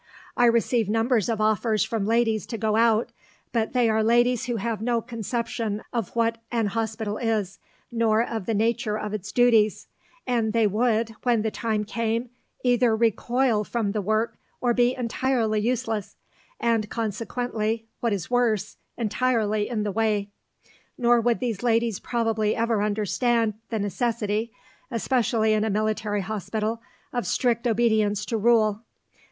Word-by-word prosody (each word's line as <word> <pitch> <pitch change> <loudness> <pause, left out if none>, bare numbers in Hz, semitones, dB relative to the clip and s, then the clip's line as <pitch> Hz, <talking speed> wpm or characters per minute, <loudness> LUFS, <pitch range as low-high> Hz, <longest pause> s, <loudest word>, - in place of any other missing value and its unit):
I 245 - +4
receive 235 -2 +2
numbers 225 0 +1
of 225 -2 -1
offers 215 0 +2
from 220 -4 -2
ladies 225 -1 +1
to 230 - -4
go 215 0 0
out, 230 +1 +3 0.4
but 225 -2 -1
they 245 -2 +3
are 220 0 +2
ladies 240 +1 +3
who 240 -1 -2
have 220 0 -2
no 235 0 +1
conception 230 -2 -3
of 230 -6 -1
what 230 0 +1
an 230 -2 +1
hospital 220 0 -2
is, 215 -5 -1 0.3
nor 225 -1 +2
of 225 -5 -4
the 225 - +1
nature 225 0 0
of 210 -1 -4
its 210 -1 -5
duties; 225 -4 +3 0.4
and 230 -3 0
they 230 -1 +3
would, 225 +2 +1
when 235 -4 +2
the 220 - -1
time 215 -2 -1
came, 230 +2 -2 0.3
either 245 -2 +3
recoil 235 +1 +1
from 215 -1 -2
the 210 0 -1
work 215 +3 -1 0.2
or 245 -1 +2
be 245 +1 +2
entirely 235 -2 0
useless, 225 -2 -2 0.4
and 225 -3 +1
consequently 225 0 -2
what 235 - 0
is 195 -4 -2
worse 240 -5 +1 0.2
entirely 215 -2 0
in 220 -4 -1
the 205 - -1
way. 210 -1 0 0.7
Nor 240 -1 +4
would 235 0 +1
these 230 -6 -2
ladies 230 -3 +1
probably 225 -3 0
ever 230 -2 +1
understand 215 +2 +1 0.2
the 225 - -1
necessity, 215 +1 -1 0.4
especially 230 -3 +1
in 215 0 +2
a 220 - 0
military 215 0 0
hospital, 215 +3 -3 0.3
of 245 -1 -2
strict 240 -1 +1
obedience 215 -3 +2
to 230 - -1
rule. 215 -1 +3
225 Hz, 150 wpm, -25 LUFS, 215-235 Hz, 0.7 s, I